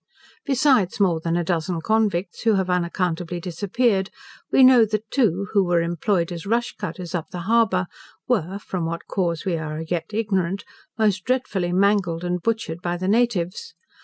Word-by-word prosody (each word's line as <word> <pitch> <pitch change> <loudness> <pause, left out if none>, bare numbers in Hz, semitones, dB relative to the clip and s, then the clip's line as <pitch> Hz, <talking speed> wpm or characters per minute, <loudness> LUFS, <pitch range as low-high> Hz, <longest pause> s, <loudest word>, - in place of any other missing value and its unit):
Besides 265 -9 +3
more 180 -5 +3
than 165 +1 -1
a 175 - 0
dozen 170 0 -1
convicts 200 -2 0
who 225 -2 +3
have 190 -1 0
unaccountably 175 -1 -1
disappeared, 190 +3 0 0.4
we 265 - +6
know 255 -2 +8
that 215 0 -2
two, 200 - +1
who 200 -2 +4
were 175 -2 +2
employed 170 +1 0
as 170 +2 -6
rush 235 +3 0
cutters 180 -2 -6
up 170 -3 -3
the 175 - -6
harbour, 195 -2 +2 0.4
were 195 -6 0
(from 185 -4 -4
what 170 0 -5
cause 170 -2 -2
we 180 -3 0
are 155 0 -4
yet 165 +3 -3
ignorant) 200 -4 -1 0.3
most 210 -4 +1
dreadfully 220 -8 -1
mangled 185 -3 +2
and 180 0 -2
butchered 195 -6 -2
by 175 0 -2
the 185 +1 -3
natives. 220 - 0
185 Hz, 165 wpm, -23 LUFS, 170-215 Hz, 0.4 s, know